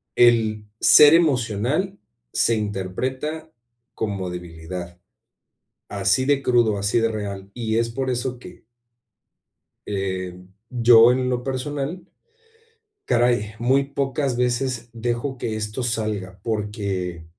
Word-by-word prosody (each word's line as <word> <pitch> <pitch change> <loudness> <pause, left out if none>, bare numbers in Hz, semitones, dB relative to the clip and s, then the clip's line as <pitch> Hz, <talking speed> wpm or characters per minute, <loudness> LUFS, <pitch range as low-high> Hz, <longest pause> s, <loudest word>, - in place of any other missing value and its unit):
el 110 -3 +3 0.2
ser 150 +1 +8
emocional 145 - +1 0.4
se 115 - +2
interpreta 130 +10 -3 0.5
como 100 -4 -3
debilidad, 85 0 -8 0.9
así 130 - +1
de 140 0 +2
crudo, 120 -5 +3
así 100 +3 +1
de 115 0 +2
real, 100 -2 -5
y 110 -2 -1
es 115 - 0
por 130 +3 -3
eso 125 0 -2
que - - -13 1.2
em, 95 -2 -4 0.2
yo 120 -1 +6
en 125 0 0
lo 125 -1 -1
personal, 145 +6 -4 1.0
caray, 120 -3 +1
muy 130 +4 +2
pocas 135 -1 -2
veces 120 -1 -1
dejo 120 +3 -3
que 110 -3 -3
esto 105 +3 -4
salga, 105 -5 -3
porque 100 -6 -3
115 Hz, 110 wpm, -23 LUFS, 100-130 Hz, 1.2 s, ser